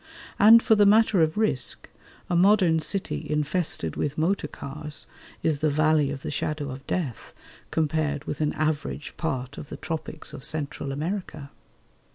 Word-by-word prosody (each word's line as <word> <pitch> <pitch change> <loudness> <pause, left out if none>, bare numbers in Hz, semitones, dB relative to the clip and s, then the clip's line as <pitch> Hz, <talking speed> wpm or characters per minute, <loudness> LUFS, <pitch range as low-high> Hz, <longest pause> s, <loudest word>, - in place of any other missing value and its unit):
And 225 +3 +8
for 225 - +4
the 205 -1 +5
matter 215 -3 +5
of 160 +4 +1
risk, 175 - 0 0.4
a 175 - -1
modern 180 -3 +4
city 155 - -3
infested 150 - -1
with 150 0 -2
motor 165 +1 +1
cars 150 +1 -6 0.4
is 155 -3 +1
the 155 +1 +2
"valley 155 -1 +3
of 140 -1 -6
the - - -4
shadow 145 -1 -2
of 135 +2 -9
death" 145 -11 -3 0.3
compared 155 -2 0
with 150 - -5
an 150 - +1
average 155 -1 -2
part 135 -4 -3
of 145 - -9
the - - -7
tropics 160 -1 -5
of 135 - -8
Central 150 -2 -3
America. 155 -1 -4
155 Hz, 160 wpm, -26 LUFS, 145-175 Hz, 0.4 s, And